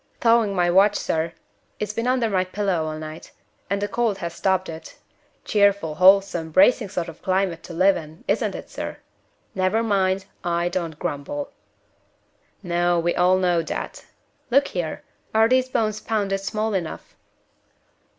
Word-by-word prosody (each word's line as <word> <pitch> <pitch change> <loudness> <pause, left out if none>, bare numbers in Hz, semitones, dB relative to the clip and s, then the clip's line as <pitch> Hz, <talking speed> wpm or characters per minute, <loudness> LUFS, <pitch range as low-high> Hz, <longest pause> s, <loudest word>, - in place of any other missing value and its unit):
"Thawing 230 -4 +3
my 175 -1 +2
watch, 200 +3 +5
sir. 165 +1 -1 0.5
It's 210 0 -3
been 230 +3 -2
under 250 -2 +2
my 190 -3 +1
pillow 185 -3 -1
all 155 0 -4
night, 155 +1 -8 0.4
and 200 +1 0
the 205 - -1
cold 220 -1 0
has 170 -3 -5
stopped 190 +1 0
it. 160 0 -9 0.5
Cheerful, 200 -6 +2
wholesome, 185 -1 +4
bracing 200 +6 +4
sort 175 -3 -3
of 165 - -11
climate 185 -3 0
to 175 - -10
live 190 +3 +4
in; 160 0 -9
isn't - - 0
it, - - -9
sir? - - -5 0.6
Never 190 +4 +1
mind! 190 -3 +1 0.2
I 170 0 0
don't 170 -4 -3
grumble." 215 - -4 1.1
"No, 175 -1 +1
we 175 +1 +1
all 180 +1 +3
know 180 -2 +2
that. 160 - -6 0.4
Look 275 +3 +3
here! 170 -4 -4 0.3
Are 220 +1 +6
these 255 +1 +2
bones 215 -4 0
pounded 200 -3 -1
small 215 +2 -2
enough?" 175 -5 -4
190 Hz, 155 wpm, -23 LUFS, 170-210 Hz, 1.1 s, Are